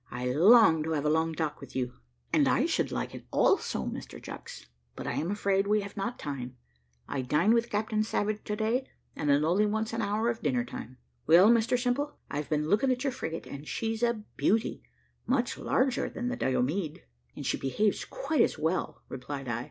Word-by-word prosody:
I 125 +1 -5
long 165 - +6
to 160 +1 -2
have 150 -1 -1
a 150 - +3
long 160 +1 +1
talk 155 -1 -2
with 135 -2 -11
you." 125 -1 -1 0.4
"And - - +4
I - - +3
should - - 0
like - - -3
it - - -10
also, - - +2
Mr - - -6
Chucks, - - -9 0.3
but - - -7
I - - -1
am 165 - -2
afraid 200 -1 +1
we 210 0 +3
have 200 0 -8
not 235 +5 -3
time; 130 -3 -6 0.5
I 135 - -2
dine 150 - +3
with 235 0 +2
Captain 215 +1 0
Savage 215 -1 -1
to 210 - -2
day, 230 +5 0 0.3
and 150 - -2
it 140 +1 +4
only 185 +7 +3
wants 220 +1 -1
an 230 - -1
hour 210 +2 0
of 230 - -7
dinner 125 -5 0
time." 125 +1 -8 0.3
"Well, 180 +7 +8
Mr 235 +1 +3
Simple, 250 +4 -1 0.2
I've 145 +1 -3
been 150 0 0
looking 210 +9 +3
at 250 +1 -1
your 275 -2 0
frigate, 165 -10 -5
and 140 +2 -9
she's 225 0 -2
a 235 -3 +1
beauty 220 +2 +1 0.5
much 250 -2 +1
larger 260 -1 0
than 245 0 -3
the 250 - -2
Diomede." 145 - -1 0.3
"And - - -7
she - - 0
behaves 200 +10 0
quite 410 -12 -1
as - - +2
well," 160 +4 -2
replied 135 +1 -6
I. 120 -1 -1
200 Hz, 205 wpm, -29 LUFS, 150-225 Hz, 0.5 s, Well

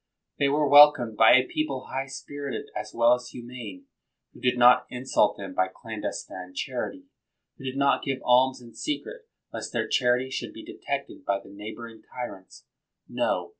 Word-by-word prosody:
They 140 - +3
were 150 +1 +2
welcomed 145 -5 +7
by 110 +2 +7
a 130 0 +4
people 140 -4 -3
high 135 +1 -3
spirited 140 0 -6
as 105 0 -5
well 120 +1 +4
as 125 0 -3
humane, 120 -6 -9 0.5
who - - -15
did 125 -1 +1
not 125 +1 +6
insult 125 -4 +1
them 95 -2 -7
by 95 0 +1
clandestine 95 -3 -7
charity; 135 - -4 0.6
who 135 - -10
did 130 +1 -4
not 140 0 +3
give 135 -2 -2
alms 130 +1 +4
in 120 -1 -14
secret 455 +10 -5 0.3
lest - - -6
their - - -1
charity 125 +1 +1
should - - -4
be - - -10
detected - - -5
by 100 0 0
the 100 - -16
neigh 105 +2 -8
boring 115 -1 -11
tyrants! 100 -7 -9 0.4
No! - - -1
125 Hz, 170 wpm, -26 LUFS, 110-135 Hz, 0.6 s, welcomed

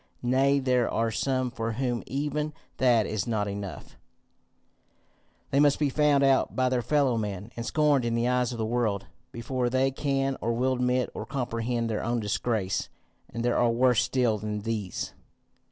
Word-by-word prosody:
Nay 135 +3 +3
there 130 -3 +2
are 115 0 0
some 130 +2 -1
for 115 -2 -3
whom 120 0 -1
even 150 +3 -2 0.2
that 120 -4 +4
is 105 0 -2
not 105 -3 0
enough; 100 -1 -7 1.5
they 140 - +3
must 145 -1 +4
be 145 -2 +1
found 145 -1 +3
out 135 -1 +3
by 130 0 +2
their 125 -1 +1
fellow 135 -3 +2
men, 105 0 -5
and 115 - -4
scorned 150 -4 +3
in 115 0 0
the 115 +1 +1
eyes 125 -1 +1
of 120 - -5
the 110 - -1
world, 110 -4 0 0.3
before 125 +1 -2
they 130 +2 +2
can 135 -1 -1
or 115 +1 0
will 130 +3 +1
admit 125 0 0
or - - -6
comprehend 120 -2 -2
their 110 -2 -2
own 120 +1 0
disgrace. 105 -2 -1 0.4
And 115 +1 -3
there 120 - +2
are 120 - +3
worse 125 0 +3
still 120 -5 +1
than 105 0 -4
these. 105 -4 -3
120 Hz, 175 wpm, -27 LUFS, 115-130 Hz, 1.5 s, that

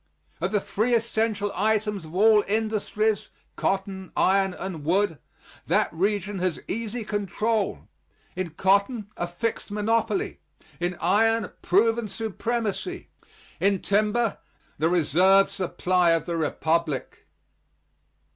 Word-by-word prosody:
Of - - +1
the 210 - +2
three 230 +5 0
essential 220 -2 0
items 210 -2 0
of 155 +2 -11
all 210 +1 +5
industries 215 0 0 0.3
cotton, 190 -1 -2
iron 195 -1 +3
and 180 -6 -6
wood 175 0 +1 0.5
that - - +2
region 200 +2 -1
has 180 -3 -1
easy 230 +2 -3
control. 210 +1 -1 0.5
In 185 -2 -2
cotton, 200 +6 +1
a 175 - -2
fixed 175 +8 -3
monopoly 225 - 0 0.4
in 175 +1 -2
iron, 225 +4 +2
proven 225 +4 +2
supremacy 225 - -3 0.5
in 200 -1 +2
timber, 215 +2 +1 0.4
the 160 +2 +2
reserve 180 +4 +4
supply 180 -2 +1
of 165 -2 0
the 170 - -2
Republic. 160 -2 -1
200 Hz, 110 wpm, -25 LUFS, 180-220 Hz, 0.5 s, all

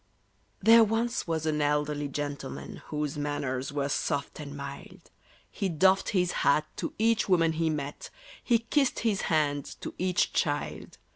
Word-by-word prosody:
THERE 225 +2 +8
once 225 +1 0
was 160 -1 -1
an 155 -1 0
elderly 150 0 0
gentleman, 140 -1 -5
Whose 150 0 -3
manners 140 -3 -2
were 140 -1 -1
soft 140 0 -2
and 145 -1 -7
mild: 140 0 -9 0.4
He 195 -3 -2
doffed 190 +4 +3
his 180 -3 +1
hat 150 +2 +3
to - - -4
each 225 -1 +2
woman 165 -3 +4
he 160 0 0
met, 145 -2 -4 0.3
He 235 - +4
kissed 260 +4 0
his 215 -4 +1
hand 145 -3 +1 0.2
to - - -5
each 180 -1 +1
child. 145 -1 -2
155 Hz, 150 wpm, -28 LUFS, 145-190 Hz, 0.4 s, THERE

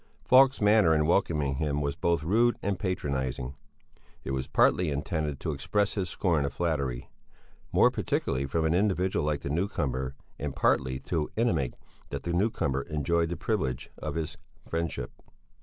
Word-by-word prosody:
Falk's 130 +1 +6
manner 105 -6 +5
in 75 0 +2
welcoming 75 -5 +1
him 75 -1 0
was 70 -1 -1
both 85 -2 0
rude 115 +8 +3
and 100 -2 -1
patronizing; 70 - -2 0.7
it - - -4
was 65 0 -2
partly 90 -3 +3
intended 75 0 -2
to 80 - -2
express 100 +8 0
his 95 -4 -2
scorn 85 -4 +1
of 70 - -1
flattery, 70 -5 -2 0.6
more - - +5
particularly 70 +2 -1
from 80 +4 0
an 80 - +2
individual 95 -2 +1
like 75 -1 0
the - - -4
newcomer, 70 -7 -1 0.2
and 70 -1 -4
partly 65 -1 +1
to 75 +2 -2
intimate 110 - +1 0.3
that - - -5
the 85 - -2
newcomer 85 -8 +1
enjoyed 80 +2 +1
the 85 - -3
privilege 70 - -2
of - - -4
his 80 +2 -3 0.3
friendship. 80 -7 -3
80 Hz, 155 wpm, -28 LUFS, 70-90 Hz, 0.7 s, Falk's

